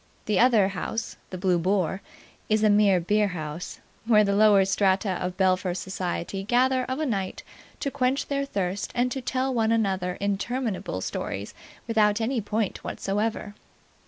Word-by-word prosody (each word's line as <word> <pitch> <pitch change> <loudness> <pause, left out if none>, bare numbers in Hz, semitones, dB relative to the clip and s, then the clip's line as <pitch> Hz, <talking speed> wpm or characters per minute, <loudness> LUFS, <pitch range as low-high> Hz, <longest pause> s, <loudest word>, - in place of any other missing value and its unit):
The 210 -3 +1
other 225 -6 +5
house, 205 +3 -4
the 185 - -6
Blue 180 -1 +1
Boar, 190 +1 0 0.5
is 215 0 +2
a 215 - +5
mere 205 -3 +4
beerhouse, 175 -4 -2 0.3
where 215 -3 +6
the 200 -1 +1
lower 205 -2 +6
strata 195 +1 +2
of 180 0 -3
Belpher 185 -1 +1
society 190 0 -3
gather 255 +4 +2
of 260 +1 -3
a 310 - -1
night 195 -8 -3 0.4
to 280 - -1
quench 255 +2 0
their 280 -1 -1
thirst 195 -5 -3
and 250 +1 +1
to 265 - -3
tell 260 +1 -1
one 225 -2 +1
another 190 -5 0
interminable 205 - -2
stories 100 +2 -4 0.3
without 215 -2 +3
any 230 +1 0
point 210 0 -2
whatsoever. 205 +1 -2
205 Hz, 155 wpm, -26 LUFS, 190-230 Hz, 0.5 s, where